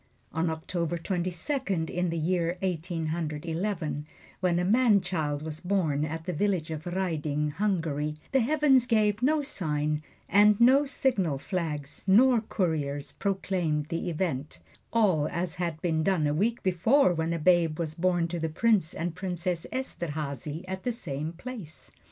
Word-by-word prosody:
On 165 +1 +1
October 170 +1 -2
Twenty 180 +1 -2
second, 190 - -2
in 180 0 0
the 165 - -2
year 170 +1 0
Eighteen 170 -2 -2
Hundred 155 -2 -3
Eleven, 160 -4 -2 0.3
when 175 -2 +2
a 180 - +1
man 220 0 +5
child 150 -6 -2
was 155 0 -5
born 170 -6 0
at 160 +1 -5
the 180 - -2
village 180 -2 0
of 155 +2 -5
Raiding, 155 -5 -1
Hungary, 155 -5 -1
the 270 - +4
heavens 270 -1 +4
gave 215 -2 +2
no 295 +3 +3
sign, 150 - -1 0.3
and 205 +2 +5
no 265 +4 +6
signal 210 - +1
flags 150 -3 -4
nor 235 +4 +6
couriers 155 -9 -2
proclaimed 180 -6 -1
the 170 +2 -2
event, 155 -4 -3 0.3
all 185 -10 +3
as 170 -1 -2
had 170 -3 -2
been 160 -3 +1
done 165 -2 +2
a 145 - +1
week 220 +9 0
before 190 +5 +4
when 165 0 -1
a 170 - 0
babe 165 -1 +3
was 160 -2 -2
born 175 0 +1
to 175 0 -3
the 160 0 -1
Prince 190 0 +2
and 170 0 -2
Princess 180 -1 -3
Esterhazy 155 - -4
at 190 0 -4
the 245 - -1
same 155 - -4
place. 180 -2 -9
175 Hz, 160 wpm, -28 LUFS, 155-200 Hz, 0.3 s, no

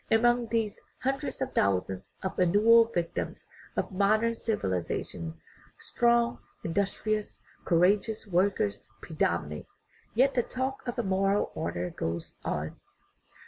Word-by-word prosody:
And 225 - +5
among 240 0 +3
these 220 -2 -1 0.2
hundreds 270 +1 -2
of 260 - -5
thousands 95 0 0
of 190 - -3
annual 215 +6 +6
victims 175 -7 -3 0.3
of - - -1
modern 215 +4 +3
civilization 90 - -3 0.4
strong, 235 0 +2 0.2
industrious, 200 +4 -1 0.3
courageous 200 +6 +2
workers 180 - 0
predominate. 85 - -1 0.5
Yet 265 +4 +4
the 245 - +3
talk 260 +2 -4
of 240 - -3
a 240 - 0
"moral 195 +1 +1
order" 90 - -3
goes 85 0 -4
on. 75 +1 -3
200 Hz, 115 wpm, -29 LUFS, 155-230 Hz, 0.5 s, annual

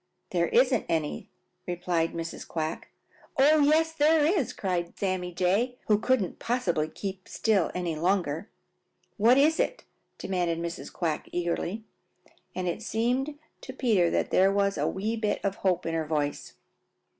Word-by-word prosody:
"There 170 -2 +2
isn't 250 -1 +3
any," 160 -3 -2 0.4
replied 175 -2 -1
Mrs. 165 0 -6
Quack. 160 -1 -4 0.5
"Oh, 300 +3 +6
yes, 310 +3 +4
there 310 0 +4
is!" 310 - +1
cried 180 -5 -3
Sammy 185 -2 -1
Jay, 195 +8 +1
who 210 -1 +3
couldn't 230 -6 0
possibly 180 -11 0
keep 190 +2 -6
still 205 -6 +1
any 175 -3 -2
longer. 175 +1 0 0.7
"What 230 +4 +5
is 310 +3 +4
it?" - - -1 0.3
demanded 175 -3 -1
Mrs. 170 +1 -5
Quack 165 -4 -2
eagerly, 175 +4 -2 0.7
and 185 -1 -2
it 175 - -2
seemed 255 +6 -1 0.2
to 260 - -8
Peter 215 -10 +2
that - - -1
there 190 +1 +5
was 200 0 +1
a - - 0
wee 215 +4 -2
bit 215 -2 0
of 195 0 -1
hope 185 -2 0
in 165 - -2
her 160 -1 -1
voice. 150 -2 -2
190 Hz, 150 wpm, -28 LUFS, 170-245 Hz, 0.7 s, Oh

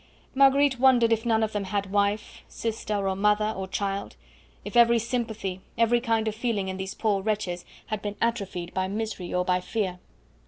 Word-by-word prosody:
Marguerite 275 -1 +4
wondered 245 -3 +5
if 225 +1 -2
none 225 -1 +3
of 220 - -1
them 205 -2 -2
had 200 0 -2
wife, 205 +1 0
sister, 215 -3 -3
or 190 - 0
mother, 210 +2 +2
or 190 0 -4
child; 195 +1 -3 0.5
if - - -7
every 235 0 +6
sympathy, 220 -5 -3 0.2
every 230 +1 +3
kind 225 -2 +1
of 215 - 0
feeling 220 -4 -1
in 190 - -4
these 190 0 -5
poor 205 -3 +1
wretches 200 -4 -2 0.2
had 215 -2 -4
been 205 0 -4
atrophied 195 -6 -2
by 185 0 0
misery 210 -3 -4
or 180 0 0
by 180 0 +2
fear. 180 -1 -3
210 Hz, 185 wpm, -26 LUFS, 195-230 Hz, 0.5 s, every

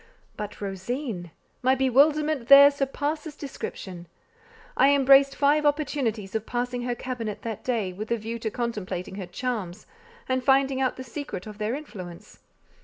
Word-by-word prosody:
But 210 -1 -6
Rosine! 200 - -4 0.3
My 260 +1 +3
bewilderment 280 +1 +3
there 280 +1 +10
surpasses 290 +2 -3
description. 190 - -7 0.7
I 280 +1 +5
embraced 275 0 +6
five 295 +1 +3
opportunities 275 -9 -1
of 220 -1 -3
passing 245 0 -2
her 245 0 -2
cabinet 235 -5 -5
that 225 -3 -5
day, 220 -7 -1
with 215 +4 -6
a 235 - +1
view 225 +2 -5
to 225 - -2
contemplating 205 -6 -4
her 190 -3 -5
charms, 210 -2 -4 0.4
and 260 0 0
finding 270 0 +3
out 260 - +1
the 260 - -7
secret 255 -7 -6
of 210 -1 -10
their 215 +4 -1
influence. 185 - -10
245 Hz, 150 wpm, -26 LUFS, 210-275 Hz, 0.7 s, there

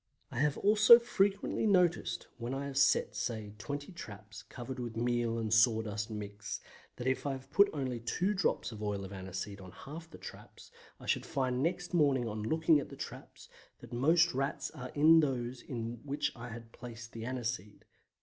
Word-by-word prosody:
I 120 - -4
have 150 0 +2
also 215 +3 +8
frequently 205 -3 +1
noticed 180 -4 +2
when 120 +3 -3
I 140 +1 -3
have 140 -1 -6
set, - - +3
say, 110 -4 -3
20 145 +7 -5
traps 105 - -9
covered 125 +1 -7
with 120 -2 -5
meal 120 -1 +1
and 110 -1 -1
sawdust 110 -2 +3
mixed, 105 -1 -6 0.3
that 125 - -6
if 130 +2 0
I 140 - 0
have 135 +1 -9
put 200 0 +6
only 130 -5 -3
two 180 - 0
drops 195 -9 0
of 110 -1 -8
oil 100 -2 -2
of 95 - -8
aniseed 95 +1 -6
on 95 -1 -10
half 160 - -9
the - - -11
traps - - -11 0.3
I - - -11
should - - +1
find 130 -2 0
next 175 +3 -1
morning 140 -7 +3
on 105 -1 -4
looking 160 +6 +3
at 140 - -6
the - - -9
traps - - -9 0.3
that 120 0 -12
most 160 +7 +4
Rats 140 +1 -2
are 125 0 -7
in 160 +3 +7
those 130 -4 -1
in 115 -2 -5
which 145 +1 -1
I 120 0 -8
had 115 0 -9
placed 115 -1 -9
the 115 - -7
aniseed. 120 -5 -4
125 Hz, 190 wpm, -33 LUFS, 110-150 Hz, 0.3 s, also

